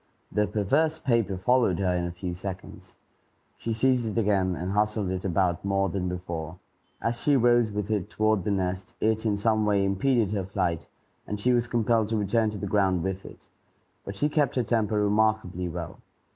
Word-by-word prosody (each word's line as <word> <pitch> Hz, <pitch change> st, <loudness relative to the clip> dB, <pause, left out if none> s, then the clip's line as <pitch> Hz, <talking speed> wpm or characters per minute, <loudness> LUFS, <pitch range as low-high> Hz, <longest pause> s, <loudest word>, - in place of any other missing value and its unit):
The 105 Hz, 0 st, +1 dB
perverse 135 Hz, +11 st, +1 dB
paper 115 Hz, -7 st, 0 dB
followed 115 Hz, -2 st, +2 dB
her 95 Hz, -2 st, +1 dB
in 90 Hz, 0 st, -1 dB
a -, -, -4 dB
few 90 Hz, 0 st, -5 dB
seconds. 95 Hz, +1 st, -8 dB, 0.6 s
She 115 Hz, -, -3 dB
seized 125 Hz, +1 st, +2 dB
it 110 Hz, +1 st, -1 dB
again, 95 Hz, -4 st, +1 dB
and 90 Hz, +3 st, -4 dB
hustled 105 Hz, -1 st, 0 dB
it 95 Hz, 0 st, -3 dB
about 90 Hz, -2 st, 0 dB
more 100 Hz, 0 st, +1 dB
than 90 Hz, +1 st, -2 dB
before. 85 Hz, -2 st, -5 dB, 0.4 s
As 115 Hz, 0 st, -2 dB
she 145 Hz, -, +3 dB
rose 120 Hz, -3 st, +4 dB
with 105 Hz, 0 st, -3 dB
it 105 Hz, -2 st, -1 dB
toward 110 Hz, -2 st, +1 dB
the 105 Hz, -, -2 dB
nest, 95 Hz, -1 st, -2 dB
it 110 Hz, +1 st, +1 dB
in 105 Hz, -1 st, +1 dB
some 110 Hz, +1 st, +2 dB
way 100 Hz, -2 st, +2 dB
impeded 105 Hz, +2 st, +1 dB
her 100 Hz, -3 st, -1 dB
flight, 90 Hz, -4 st, -1 dB, 0.4 s
and 105 Hz, -, -4 dB
she 125 Hz, +4 st, +2 dB
was 120 Hz, 0 st, +1 dB
compelled 115 Hz, -2 st, +1 dB
to 110 Hz, -, 0 dB
return 110 Hz, +2 st, +1 dB
to 105 Hz, -, -6 dB
the 100 Hz, -, -4 dB
ground 95 Hz, -3 st, +1 dB
with 95 Hz, 0 st, -4 dB
it. -, -, -14 dB, 0.6 s
But 100 Hz, -, -7 dB
she 145 Hz, -, +1 dB
kept 150 Hz, -3 st, +1 dB
her 125 Hz, -, +2 dB
temper 110 Hz, -2 st, +1 dB
remarkably 105 Hz, -4 st, +1 dB
well. 85 Hz, -1 st, -6 dB
105 Hz, 195 wpm, -27 LUFS, 95-110 Hz, 0.6 s, rose